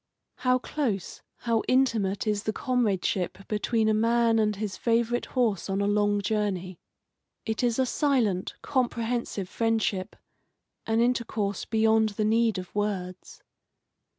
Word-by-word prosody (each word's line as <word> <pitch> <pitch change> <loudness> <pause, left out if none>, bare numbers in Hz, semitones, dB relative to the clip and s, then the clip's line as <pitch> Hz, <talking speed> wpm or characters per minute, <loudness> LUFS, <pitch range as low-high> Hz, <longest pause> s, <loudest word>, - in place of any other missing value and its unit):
How 255 0 +2
close, 245 - -3 0.2
how 230 -2 +1
intimate 230 -7 +1
is 210 -1 0
the 215 +1 -2
comradeship 195 -7 -1
between 220 +1 0
a 215 - +3
man 230 +1 +3
and 210 -1 +1
his 200 -1 -4
favourite 235 +1 0
horse 225 -8 0
on 195 0 0
a 200 - +1
long 205 0 +2
journey. 195 -4 -2 0.7
It 220 -1 -2
is 240 -2 +1
a 260 - +3
silent, 240 -9 0
comprehensive 235 -6 -1
friendship, 220 -3 -1 0.7
an 225 +1 +2
intercourse 230 -5 -1
beyond 220 0 +3
the 215 - +1
need 225 0 +2
of 185 -1 -7
words. 190 -3 -4
220 Hz, 130 wpm, -27 LUFS, 200-235 Hz, 0.7 s, a